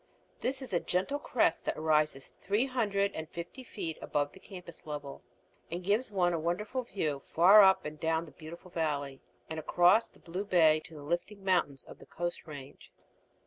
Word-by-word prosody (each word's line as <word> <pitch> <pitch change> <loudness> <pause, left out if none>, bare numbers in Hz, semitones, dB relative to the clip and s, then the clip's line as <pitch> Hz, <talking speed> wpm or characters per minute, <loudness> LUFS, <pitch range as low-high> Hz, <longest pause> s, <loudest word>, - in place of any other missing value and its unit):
This 265 +1 -2
is 250 - -8
a 175 - +3
gentle 190 +14 -1
crest 235 - +1
that - - -1
rises 155 -3 +1
three 205 +6 +1
hundred 205 -6 0
and 160 0 -6
fifty 175 +10 -7
feet 165 -9 -5
above 145 0 -1
the - - -15
campus 180 -5 -11
level, 145 -2 -6 0.5
and 175 +2 -4
gives 210 +7 +1
one 180 -3 +2
a 165 - 0
wonderful 195 +10 -1
view 155 - -2
far 190 +6 +7
up 190 -1 +5
and 150 0 -6
down 160 +1 0
the 160 - -13
beautiful 170 +3 -11
valley 145 -5 -2 0.3
and 160 0 -4
across 175 +7 +4
the - - -22
blue 180 +3 -5
bay 160 -5 +5
to 165 -3 -11
the 145 - -9
lifting 175 +6 -3
mountains 170 -8 +2
of - - -13
the - - -14
Coast 175 0 -4
Range. 145 -2 -10
175 Hz, 185 wpm, -31 LUFS, 155-200 Hz, 0.5 s, far